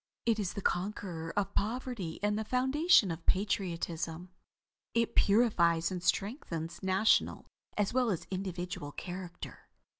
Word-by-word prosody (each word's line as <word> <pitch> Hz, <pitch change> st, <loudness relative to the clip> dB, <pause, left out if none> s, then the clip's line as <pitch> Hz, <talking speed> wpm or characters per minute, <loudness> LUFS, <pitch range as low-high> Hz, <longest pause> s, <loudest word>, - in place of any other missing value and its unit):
It 230 Hz, -2 st, +2 dB
is 200 Hz, -4 st, -2 dB
the 200 Hz, -, -5 dB
conqueror 175 Hz, -3 st, -2 dB
of 200 Hz, -1 st, 0 dB
poverty 220 Hz, -6 st, -2 dB
and 205 Hz, 0 st, +2 dB
the 220 Hz, -, -1 dB
foundation 260 Hz, -, +4 dB
of 165 Hz, 0 st, -6 dB
patriotism. 175 Hz, -3 st, -1 dB, 0.6 s
It 230 Hz, -1 st, +2 dB
purifies 185 Hz, -6 st, +3 dB
and 180 Hz, -1 st, -3 dB
strengthens 170 Hz, -, -2 dB
national, 190 Hz, +3 st, +2 dB, 0.3 s
as 205 Hz, 0 st, +1 dB
well 250 Hz, -2 st, +2 dB
as 180 Hz, -6 st, -2 dB
individual 180 Hz, -4 st, -4 dB
character. 180 Hz, -1 st, -8 dB
190 Hz, 125 wpm, -32 LUFS, 175-215 Hz, 0.6 s, foundation